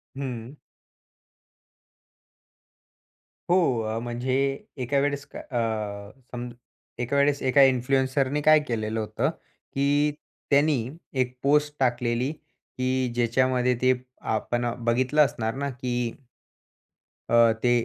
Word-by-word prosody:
हं. 130 -1 -6 2.9
हो 180 - +5 0.2
अ, 110 +1 -2
म्हणजे 120 +2 -2 0.5
एका 140 +3 0
वेळेस 140 0 0
का - - -6
अ 110 -4 -3 0.2
सम 125 0 -5 0.5
एका 125 +3 -1
वेळेस 140 0 +2
एका 140 +2 +5
इन्फ्लुएन्सरनी 130 +2 +2
काय 155 +1 +6
केलेलं 110 -1 -2
होतं 105 - -1 0.4
की 145 +2 +2 0.4
त्यानी 145 +1 +4 0.5
एक 125 0 -2
पोस्ट 150 +1 +3
टाकलेली 120 0 +1
की 130 -4 -4
ज्याच्यामध्ये 125 +1 +2
ते 130 0 +5 0.4
आपण 120 +2 -1 0.2
बघितलं 130 +5 +3
असणार 110 -4 -3
ना 140 - -1
की 125 -1 -4 1.4
अ, 115 0 +6
ते 120 - +4
130 Hz, 105 wpm, -26 LUFS, 120-140 Hz, 2.9 s, काय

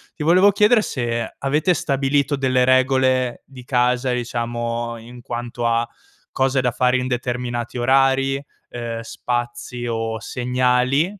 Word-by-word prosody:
Ti 150 - -5
volevo 185 +6 +5
chiedere 210 +3 +4
se 120 - -3
avete 150 +6 +1
stabilito 140 -1 0
delle 130 -2 +2
regole 130 -1 +2
di 130 -2 -13
casa, 125 0 +1
diciamo, 120 -1 -3
in 120 +2 -12
quanto 120 0 -5
a 115 0 +1 0.5
cose 130 0 +1
da 125 -1 +1
fare 125 +1 +2
in 125 0 -2
determinati 120 -1 -3
orari, 135 +2 +3 0.4
uhm, 115 -1 -5
spazi 120 +1 -4
o 115 -1 -2
segnali, 125 +4 +1
125 Hz, 130 wpm, -21 LUFS, 120-135 Hz, 0.5 s, volevo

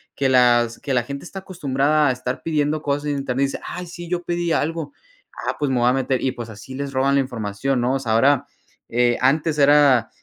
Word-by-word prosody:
que 135 - +1
las 120 -2 +3
que 140 - -3
la 125 - +2
gente 140 +3 -7
está 195 +2 -8
acostumbrada 150 -5 +1
a - - +3
estar 125 0 -4
pidiendo 155 -1 0
cosas 145 0 -2
en 145 -1 -1
Internet, 135 0 0
dice: 140 - -4
"Ay 180 - -6
sí, 175 0 -9
yo 175 0 -2
pedí 175 0 -2
algo. 160 0 -2 0.6
Ah, - - 0
pues 145 -2 0
me 130 - +1
voy 120 - +3
a 125 - +3
meter", 130 -1 0
y 130 - +1
pues, 120 -3 -8
así 110 +5 -10
les 140 0 -5
roban 135 +1 +2
la 140 - +4
información, 125 +1 -2
¿no?, 125 +2 +1
o 135 - 0
sea, 115 -4 -2
ahora, 135 +4 +3 0.4
eh, 120 0 +2
antes 150 +4 +2
era 140 -5 +5
135 Hz, 230 wpm, -21 LUFS, 125-150 Hz, 0.6 s, era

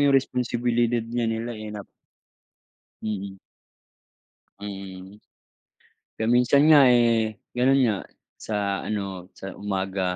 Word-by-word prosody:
yung 140 -1 +5
responsibilidad 120 -2 0
nga 120 +1 -2
nila, 115 +1 -3
eh, 110 -1 -7
nap 105 -1 -7 1.2
Mm. 100 -2 -4 1.2
Mm. 95 0 -9 0.9
Kaya 110 - -2
minsan 125 +4 +4
nga, 145 -3 +8
eh, 115 -3 +3 0.2
gano'n 130 +2 +3
nga 110 -5 +2 0.4
sa 100 -2 -2
ano, 100 -4 -4
sa 95 - -7
umaga. 95 -2 -2
110 Hz, 105 wpm, -25 LUFS, 100-120 Hz, 1.2 s, nga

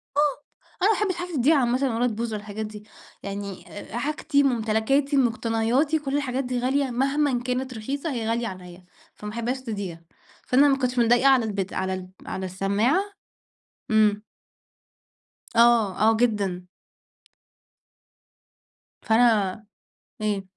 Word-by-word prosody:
آه، - - +2 0.6
أنا 425 +3 +5
ما - - 0
احبش 385 -4 +1
حاجتي 355 -1 -5
تضيع 285 +4 +4
عامةً 250 0 +1
ولا 245 +1 +2
تبوظ 230 0 -3
والحاجات 210 +1 -5
دي، 210 0 -10 0.4
يعني 200 -1 -6 0.3
حاجتي، 290 +1 +1
ممتلكاتي، 260 +3 +1
مقتنياتي 245 +4 +1
كُلّ 280 -1 -2
الحاجات 270 -2 -1
دي 250 0 -2
غالية 265 +2 0
مهمًا 270 0 +1
كانت 255 0 -3
رخيصة 275 +8 -4
هي 225 -3 -3
غالية 230 0 0
عليَّ، 180 -1 -10 0.3
فما 210 0 -7
احبهاش 240 +3 -2
تضيع، 200 -9 -5 0.5
فأنا 275 +3 +5
ما 270 - +3
كنتش 250 -1 -1
مضايقة 240 +3 +4
على 260 -4 +5
البت 200 -3 -3
على 190 0 -2
ال 185 -1 -7 0.2
على 190 0 -4
السماعة 200 - +1 0.9
إمم. 210 -1 +3 1.3
آه 230 -4 +4
آه 225 0 +4
جدًا. 200 -6 0 2.6
فأنا 215 -2 +2 0.6
إيه؟ 205 -2 -1
235 Hz, 130 wpm, -25 LUFS, 210-270 Hz, 2.6 s, أنا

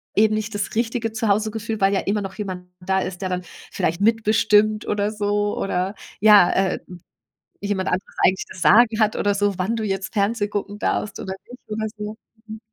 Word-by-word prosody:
eben 215 +1 +4
nicht 215 0 -3
das 205 0 -3
richtige 225 0 -1
Zuhausegefühl, 220 0 -1
weil 195 +1 +3
ja 195 - +2
immer 205 +1 -1
noch 195 0 -6
jemand 185 -4 -6
da 190 +1 0
ist, 185 -1 -4
der 185 - -2
dann 180 0 -2 0.3
vielleicht 170 +4 -1
mitbestimmt 215 -1 +3
oder 210 0 0
so 205 0 -1
oder 190 +1 -1 0.2
ja, 210 -3 +7
äh 190 -1 +1 0.8
jemand 200 -2 -1
anderes 185 +2 -3
eigentlich 190 +1 +3
das 185 - -10
Sagen 220 +7 +5
hat 215 0 +2
oder 205 0 +1
so, 200 -2 0
wann 195 +5 0
du 225 - -2
jetzt 195 -2 -3
Fernsehgucken 205 -1 -1
darfst 210 - -1
oder 190 0 -5 0.2
nicht 250 - -11
oder 220 0 -2
so? 210 +1 -6 0.3
Mhm. 220 0 -8
205 Hz, 185 wpm, -22 LUFS, 195-215 Hz, 0.8 s, ja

